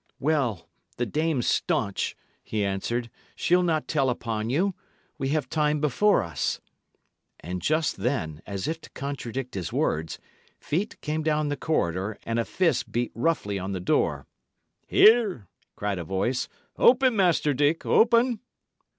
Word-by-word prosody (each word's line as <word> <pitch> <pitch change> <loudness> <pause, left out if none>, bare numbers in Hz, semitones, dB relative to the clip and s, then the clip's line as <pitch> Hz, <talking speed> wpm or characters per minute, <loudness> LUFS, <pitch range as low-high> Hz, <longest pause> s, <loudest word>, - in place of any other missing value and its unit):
"Well, 135 - 0 0.3
the 125 - 0
dame's 150 0 0
staunch," 100 -1 0 0.3
he 105 -2 -1
answered; 115 +5 -2 0.2
"she'll 180 +1 +3
not 160 -3 0
tell 135 -4 +1
upon 115 -2 -2
you. 185 +10 +1 0.5
We 135 -1 -1
have 150 +1 0
time 150 -1 +1
before 155 +8 +3
us." 85 -3 -2 0.8
And 90 +2 -5
just 155 - +1
then, 95 - -2
as 100 +4 -3
if 165 +1 -3
to - - -13
contradict 135 -2 -5
his 95 -4 -4
words, 80 +1 -1 0.4
feet 185 +8 -2
came 155 +1 -2
down 155 -1 +1
the 145 - -1
corridor, 100 - -1
and 115 0 -1
a 115 - 0
fist 170 -7 0
beat 120 +1 -1
roughly 115 -7 0
on 95 +1 -4
the 95 - -3
door. 90 - 0 0.6
"Here!" 210 - +5 0.3
cried 100 -2 -2
a - - -3
voice. 100 +9 -1 0.3
"Open, 255 -1 +5
Master 175 -6 +3
Dick; 145 +4 +1
open!" 235 0 +4
135 Hz, 145 wpm, -26 LUFS, 105-160 Hz, 0.8 s, Here